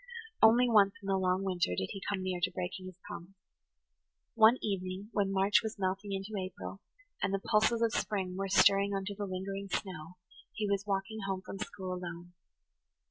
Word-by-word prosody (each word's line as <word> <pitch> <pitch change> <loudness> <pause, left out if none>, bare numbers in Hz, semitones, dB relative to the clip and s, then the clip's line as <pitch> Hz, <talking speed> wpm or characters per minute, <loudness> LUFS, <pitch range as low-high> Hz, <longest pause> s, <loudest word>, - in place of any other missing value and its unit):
[Page 455 - +1
97] - - +9
Only 245 +2 +4
once 200 -3 +6
in - - -7
the 195 - +3
long 185 0 +1
winter 175 - 0
did 95 - -1
he 195 - -6
come 195 -2 -1
near 185 -1 -2
to 185 - +2
breaking 185 +1 -5
his 185 -2 -10
promise. 175 +3 -9 1.0
One 225 +2 +6
evening, 190 0 -3
when 200 -2 +1
March 195 +2 +4
was 220 -1 -5
melting 195 +1 -2
into 195 +2 -4
April, 95 - -7 0.4
and 185 - +1
the 195 - +1
pulses 220 +3 +2
of 230 - +2
spring 190 -4 -1
were 195 +1 -2
stirring 200 +1 +5
under 195 +1 -3
the 205 0 -4
lingering 195 +1 -4
snow, 180 -3 -4 0.4
he 215 -1 -2
was 200 0 -1
walking 195 +2 -2
home 190 -1 -2
from 195 - -7
school 190 -3 -5
alone. 175 -1 -7
195 Hz, 190 wpm, -32 LUFS, 185-205 Hz, 1.0 s, 97